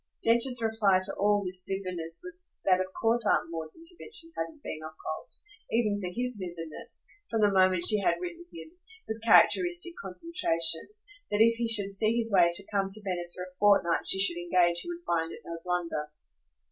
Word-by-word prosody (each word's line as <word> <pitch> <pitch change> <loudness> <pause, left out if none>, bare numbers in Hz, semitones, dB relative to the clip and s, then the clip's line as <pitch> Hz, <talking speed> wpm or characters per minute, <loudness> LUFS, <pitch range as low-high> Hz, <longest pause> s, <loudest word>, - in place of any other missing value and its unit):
Densher's 235 +1 +4
reply 215 -4 +2
to 195 - -1
all 205 0 +2
this 185 0 -1
vividness 180 -4 -3
was 355 0 -10 0.2
that 185 -1 +4
of 185 - -3
course 230 +1 +2
Aunt 205 - +1
Maud's 160 -1 -6
intervention 335 +1 -4
hadn't 310 -3 -6
been 155 - -6
occult, 155 0 -8 0.3
even 215 -3 +1
for 185 - -4
HIS 250 +3 -3
vividness, 170 -3 -7 0.2
from 225 -1 -1
the 205 -1 +4
moment 185 -2 +3
she 210 - +6
had 195 - +2
written 345 -1 -7
him, 335 -1 -11 0.4
with 220 0 -5
characteristic 350 +9 +4
concentration, 180 - +1 0.4
that 210 +1 +1
if 230 +1 +5
he 235 0 -1
should 200 -3 +3
see 215 +3 +1
his 230 -1 -2
way 180 -3 +5
to 195 +3 -1
come 195 -1 0
to 210 +2 -4
Venice 175 -3 -2
for 180 - -6
a 180 0 -12
fortnight 200 -5 +3
she 190 - +2
should 190 -3 +4
engage 175 0 +2
he - - -5
would 345 0 -7
find 165 -1 -1
it - - -10
no 170 0 -7
blunder. 170 -4 -3
200 Hz, 190 wpm, -28 LUFS, 175-230 Hz, 0.4 s, she